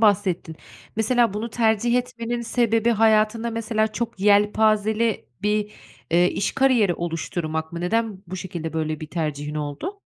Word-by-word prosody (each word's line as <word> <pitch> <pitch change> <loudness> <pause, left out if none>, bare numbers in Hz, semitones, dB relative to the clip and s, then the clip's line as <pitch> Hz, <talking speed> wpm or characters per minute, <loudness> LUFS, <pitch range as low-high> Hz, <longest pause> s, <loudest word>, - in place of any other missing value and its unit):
bahsettin. 190 -6 +2 0.4
Mesela 235 0 +2
bunu 220 +3 -3
tercih 225 +1 +2
etmenin 240 -1 -3
sebebi 230 -1 +1
hayatında 220 +1 +3
mesela 220 -1 0
çok 225 -3 -4
yelpazeli 215 +2 +3 0.2
bir, 210 0 0 0.4
eee, 175 +2 +4
iş - - -1
kariyeri 250 -9 +3
oluşturmak 160 -1 -3
mı? 170 - -5
Neden 210 +1 -1
bu 185 +2 -6
şekilde 170 -3 -5
böyle 155 -1 -2
bir 155 - -5
tercihin 150 -2 -3
oldu? 155 - -4
210 Hz, 135 wpm, -23 LUFS, 175-230 Hz, 0.4 s, eee